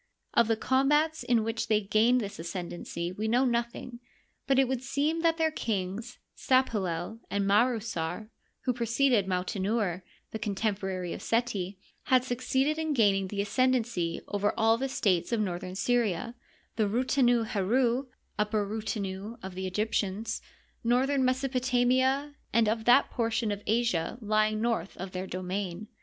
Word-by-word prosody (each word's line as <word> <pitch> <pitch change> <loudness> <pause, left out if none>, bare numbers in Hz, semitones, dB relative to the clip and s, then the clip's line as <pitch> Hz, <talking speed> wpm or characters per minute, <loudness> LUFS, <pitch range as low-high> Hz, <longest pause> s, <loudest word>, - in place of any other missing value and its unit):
Of 235 - +4
the 225 -1 +1
combats 295 +6 +2
in 240 -2 +2
which 225 +1 -2
they 215 -1 +3
gained 220 +5 +3
this 200 -5 -6
ascendency 170 0 -5
we 210 +4 -3
know 245 +4 +3
nothing; 235 0 -2 0.5
but 270 -1 +3
it 270 -1 +4
would 260 -1 -2
seem 290 +6 0
that 330 -1 +2
their 320 -1 +2
kings 220 -2 -3 0.2
Sdpalel 215 -6 0
and 200 0 0
Marusar, 215 -3 0 0.3
who 250 - 0
preceded 235 -2 +2
Mautenouer, 190 +1 -1 0.3
the 220 - -4
contem 205 0 -1
porary 185 -3 -3
of - - -7
Seti, 205 -5 -1 0.3
had 255 -1 +4
succeeded 265 +4 0
in 315 -1 0
gaining 195 -5 +3
the 200 +1 -2
ascenden 255 +4 +2
cy 175 -8 -3
over 205 0 0
all 225 0 +4
the 265 +3 -2
states 185 -7 +1
of 230 - +1
northern 185 -2 -3
Syria 235 -1 0 0.4
(the 215 -2 +2
Rutenu 245 +1 +2
heru 235 +6 +1 0.3
Upper 210 0 +1
Rutenu 210 0 -4
" - - -28
of 190 -1 -6
the 190 +1 -4
Egyptians), 210 +1 -1 0.4
northern 260 +3 +2
Mesopotamia, 260 +1 +1 0.2
and 230 -1 +3
of 220 +1 0
that 245 +3 +5
portion 230 -2 0
of 205 0 -4
Asia 225 -6 +1
lying 215 -1 +1
north 225 -6 -1
of 190 +1 -6
their 185 +1 -4
domain. 185 +2 -4
225 Hz, 150 wpm, -29 LUFS, 195-250 Hz, 0.5 s, that